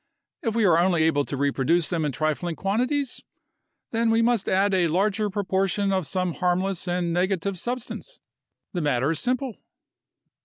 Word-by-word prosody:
If 225 Hz, -2 st, -2 dB
we 230 Hz, -2 st, +3 dB
are 170 Hz, -3 st, +5 dB
only 175 Hz, -2 st, +3 dB
able 145 Hz, -3 st, +2 dB
to 140 Hz, -, -4 dB
reproduce 145 Hz, +4 st, +1 dB
them 165 Hz, -3 st, 0 dB
in 145 Hz, -, 0 dB
trifling 155 Hz, +4 st, -1 dB
quantities, 250 Hz, -, -1 dB, 0.7 s
then 230 Hz, 0 st, +1 dB
we 225 Hz, +1 st, +3 dB
must 235 Hz, -3 st, +1 dB
add 195 Hz, +1 st, +2 dB
a 180 Hz, -2 st, +3 dB
larger 205 Hz, +5 st, +1 dB
proportion 195 Hz, 0 st, 0 dB
of 185 Hz, -5 st, 0 dB
some 185 Hz, +2 st, -1 dB
harmless 180 Hz, +1 st, -1 dB
and 175 Hz, -1 st, 0 dB
negative 185 Hz, +1 st, 0 dB
substance. 245 Hz, +3 st, -5 dB, 0.5 s
The 175 Hz, -, -1 dB
matter 140 Hz, -1 st, +1 dB
is 160 Hz, -, -1 dB
simple." 250 Hz, -2 st, -1 dB
185 Hz, 160 wpm, -25 LUFS, 165-210 Hz, 0.7 s, are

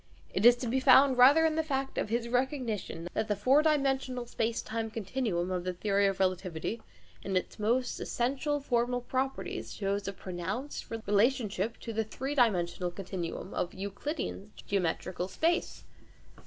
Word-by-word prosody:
It 205 Hz, +5 st, +5 dB
is 240 Hz, -, +8 dB
to 245 Hz, 0 st, -5 dB
be 255 Hz, +3 st, +1 dB
found 260 Hz, 0 st, +6 dB
rather 285 Hz, +6 st, +8 dB
in 320 Hz, -, +2 dB
the 320 Hz, -, +1 dB
fact 270 Hz, -3 st, -2 dB
of -, -, -2 dB
his 235 Hz, +1 st, -1 dB
recognition 245 Hz, -, -2 dB
that 220 Hz, -, -1 dB
the 210 Hz, -, +1 dB
four 255 Hz, +9 st, +4 dB
dimensional 270 Hz, -5 st, +1 dB
space 230 Hz, -1 st, -2 dB
time 225 Hz, 0 st, -3 dB
continuum 205 Hz, -4 st, -2 dB
of 180 Hz, -1 st, -1 dB
the 185 Hz, 0 st, -2 dB
theory 200 Hz, +2 st, +2 dB
of 195 Hz, -1 st, -1 dB
relativity, 185 Hz, +2 st, -1 dB, 0.4 s
in 190 Hz, -1 st, -1 dB
its 185 Hz, -, -4 dB
most 240 Hz, +4 st, 0 dB
essential 280 Hz, +4 st, -1 dB
formal 245 Hz, -2 st, 0 dB
properties, 265 Hz, +2 st, -3 dB
shows 200 Hz, 0 st, -2 dB
a 195 Hz, -, -2 dB
pronounced 190 Hz, -, -5 dB
relationship 220 Hz, -1 st, 0 dB
to 230 Hz, -, -5 dB
the 225 Hz, +1 st, 0 dB
three 265 Hz, +6 st, -4 dB
dimensional 180 Hz, -8 st, +2 dB
continuum 185 Hz, 0 st, -5 dB
of 175 Hz, -, -2 dB
Euclidean 200 Hz, -, -4 dB
geometrical 180 Hz, -1 st, -1 dB
space. 330 Hz, -, 0 dB
225 Hz, 155 wpm, -30 LUFS, 195-265 Hz, 0.4 s, is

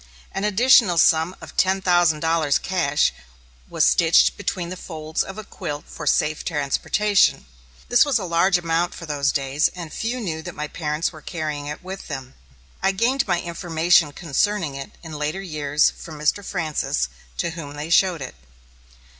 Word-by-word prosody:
An 195 Hz, -, -3 dB
additional 210 Hz, -3 st, +5 dB
sum 165 Hz, +2 st, +4 dB
of -, -, -11 dB
ten 190 Hz, +1 st, +2 dB
thousand 175 Hz, -4 st, +3 dB
dollars, 160 Hz, -3 st, +2 dB
cash, 160 Hz, -6 st, +1 dB, 0.6 s
was -, -, +2 dB
stitched -, -, +4 dB
between 175 Hz, -2 st, -3 dB
the 185 Hz, -, -5 dB
folds 155 Hz, -3 st, -4 dB
of 195 Hz, -, -9 dB
a 215 Hz, -, -6 dB
quilt 145 Hz, -6 st, -6 dB
for 150 Hz, -, -8 dB
safe 150 Hz, +1 st, +1 dB
transportation. 180 Hz, +7 st, +1 dB, 0.4 s
This 245 Hz, -, +5 dB
was 285 Hz, -4 st, +2 dB
a 205 Hz, -, -4 dB
large 175 Hz, +2 st, +3 dB
amount 170 Hz, 0 st, -1 dB
for 170 Hz, -, -8 dB
those 145 Hz, -2 st, 0 dB
days, 140 Hz, +2 st, +1 dB
and 170 Hz, -3 st, -7 dB
few 240 Hz, +3 st, -3 dB
knew 165 Hz, -8 st, -4 dB
that -, -, -8 dB
my 150 Hz, 0 st, -4 dB
parents 150 Hz, 0 st, -2 dB
were 155 Hz, -3 st, -13 dB
carrying 155 Hz, -4 st, -4 dB
it 150 Hz, +4 st, -6 dB
with 190 Hz, +1 st, -7 dB
them. 130 Hz, 0 st, -7 dB, 0.5 s
I 195 Hz, 0 st, +2 dB
gained 245 Hz, +7 st, +1 dB
my 170 Hz, -, +1 dB
information 170 Hz, -2 st, +2 dB
concerning 170 Hz, +2 st, -1 dB
it 135 Hz, 0 st, -7 dB
in 165 Hz, -, -9 dB
later 150 Hz, +5 st, -2 dB
years 150 Hz, -4 st, +1 dB
from 160 Hz, -2 st, -10 dB
Mr. 150 Hz, +7 st, 0 dB
Francis, 155 Hz, -7 st, -1 dB, 0.3 s
to 165 Hz, -, -1 dB
whom 150 Hz, -4 st, -8 dB
they 150 Hz, +3 st, -6 dB
showed 175 Hz, -4 st, +3 dB
it. 130 Hz, -, -7 dB
165 Hz, 170 wpm, -22 LUFS, 150-185 Hz, 0.6 s, additional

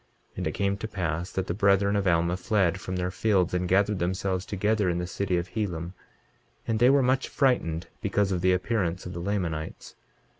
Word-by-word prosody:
23:26 -, -, -4 dB
Now -, -, -1 dB
it -, -, -6 dB
came 100 Hz, 0 st, 0 dB
to 110 Hz, -, -5 dB
pass 90 Hz, -3 st, -3 dB
that 95 Hz, -, -2 dB
the 85 Hz, -, -2 dB
brethren 100 Hz, +1 st, +3 dB
of 100 Hz, -1 st, +1 dB
Alma 85 Hz, 0 st, +2 dB
fled 95 Hz, -1 st, +1 dB
from 95 Hz, -, -4 dB
their 90 Hz, 0 st, -1 dB
fields, 95 Hz, -2 st, +1 dB
and 90 Hz, 0 st, 0 dB
gathered 100 Hz, +1 st, +2 dB
themselves 95 Hz, +1 st, -1 dB
together 105 Hz, 0 st, +1 dB
in 85 Hz, -, 0 dB
the 90 Hz, -, -2 dB
city 90 Hz, 0 st, -1 dB
of 85 Hz, +1 st, -3 dB
Helam; 90 Hz, -5 st, -3 dB, 0.7 s
and 110 Hz, -1 st, 0 dB
they 120 Hz, +2 st, +6 dB
were 140 Hz, 0 st, +4 dB
much 130 Hz, +1 st, +1 dB
frightened 95 Hz, -, +1 dB, 0.2 s
because 100 Hz, -1 st, +1 dB
of 90 Hz, -2 st, -1 dB
the 95 Hz, +1 st, +4 dB
appearance 90 Hz, -2 st, -1 dB
of 90 Hz, -, -6 dB
the 85 Hz, -, -5 dB
Lamanites. 85 Hz, -5 st, -3 dB
95 Hz, 210 wpm, -27 LUFS, 90-105 Hz, 0.7 s, they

